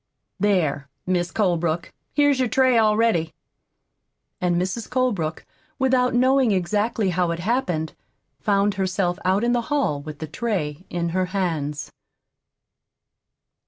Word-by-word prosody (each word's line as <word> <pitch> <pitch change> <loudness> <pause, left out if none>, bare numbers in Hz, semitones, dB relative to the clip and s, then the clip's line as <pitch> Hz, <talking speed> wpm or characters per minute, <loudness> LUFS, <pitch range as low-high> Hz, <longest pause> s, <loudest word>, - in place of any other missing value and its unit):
There, 170 -9 +1 0.2
Mis' 180 -2 0
Colebrook, 170 -5 0 0.2
here's 290 -2 +4
your 255 - +2
tray 260 +1 +3
all 215 -2 +4
ready." 175 -9 +1 1.1
And 175 -1 +2
Mrs. 190 +5 -3
Colebrook, 215 -12 -1 0.3
without 255 -2 +2
knowing 260 -1 +4
exactly 205 +2 0
how 175 0 +1
it 170 - -1
happened, 175 -6 -1 0.5
found 200 0 +2
herself 185 -1 0
out 190 +4 +2
in 240 - +2
the 240 - +2
hall 275 - 0
with 150 0 -8
the 160 - -5
tray 160 -2 -3
in 170 -1 -2
her 185 +2 0
hands. 150 -6 -2
190 Hz, 125 wpm, -23 LUFS, 170-235 Hz, 1.1 s, here's